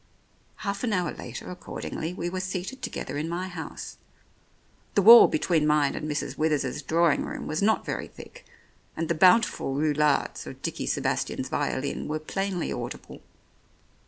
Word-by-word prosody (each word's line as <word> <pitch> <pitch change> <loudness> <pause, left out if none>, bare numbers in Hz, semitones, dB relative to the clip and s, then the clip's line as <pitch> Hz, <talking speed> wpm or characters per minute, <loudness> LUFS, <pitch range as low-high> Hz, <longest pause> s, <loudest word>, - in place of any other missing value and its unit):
Half 200 +2 -2
an 230 -4 0
hour 180 -2 0
later, - - -8
accordingly, 175 -2 -5
we 175 -1 -4
were 185 +1 -3
seated 190 +7 -4
together 140 - -4
in 160 +2 -3
my 180 +2 -3
house. 180 -3 -7 1.0
The 200 - +4
wall 230 +4 +11
between 155 -1 +1
mine 150 -2 +3
and 155 0 -4
Mrs. 150 - -3
Withers's 150 -3 0
drawing 165 +2 +2
room - - -6
was 155 +4 -2
not 220 +2 +2
very - - -3
thick, - - -13 0.5
and 165 0 -2
the - - +3
bountiful 180 -5 +4
roulades 150 -1 +1
of - - -9
Dickie - - -3
Sebastian's - - -1
violin 140 +2 -2
were 155 +1 -1
plainly 185 +3 -3
audible. - - -7
165 Hz, 155 wpm, -26 LUFS, 150-185 Hz, 1.0 s, wall